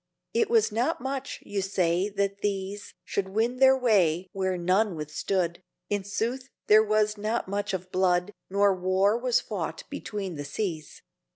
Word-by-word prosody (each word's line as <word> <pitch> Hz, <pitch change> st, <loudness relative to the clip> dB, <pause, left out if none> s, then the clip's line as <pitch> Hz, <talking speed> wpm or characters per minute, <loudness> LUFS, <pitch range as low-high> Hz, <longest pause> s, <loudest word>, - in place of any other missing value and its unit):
It 460 Hz, -3 st, +2 dB
was 455 Hz, -, +3 dB
not 245 Hz, +10 st, 0 dB
much, 270 Hz, +2 st, -4 dB
you 200 Hz, -1 st, -2 dB
say, 185 Hz, 0 st, +1 dB
that 200 Hz, 0 st, -2 dB
these 200 Hz, 0 st, -3 dB
Should 195 Hz, -1 st, -2 dB
win 225 Hz, +5 st, 0 dB
their 265 Hz, 0 st, +6 dB
way 190 Hz, -8 st, +2 dB
where 190 Hz, -1 st, -1 dB
none 185 Hz, +3 st, +2 dB
withstood; 170 Hz, +4 st, -2 dB, 0.3 s
In 205 Hz, -1 st, 0 dB
sooth 235 Hz, +6 st, -3 dB, 0.2 s
there 215 Hz, +1 st, +7 dB
was 215 Hz, 0 st, +1 dB
not 215 Hz, +1 st, -1 dB
much 200 Hz, +1 st, -2 dB
of 185 Hz, -1 st, -5 dB
blood 180 Hz, +1 st, +1 dB, 0.2 s
No 200 Hz, +1 st, +3 dB
war 185 Hz, +3 st, +2 dB
was 245 Hz, 0 st, +2 dB
fought 170 Hz, -6 st, -4 dB
between 200 Hz, -6 st, -5 dB
the 145 Hz, -, -4 dB
seas. 160 Hz, 0 st, -4 dB
200 Hz, 160 wpm, -27 LUFS, 185-220 Hz, 0.3 s, there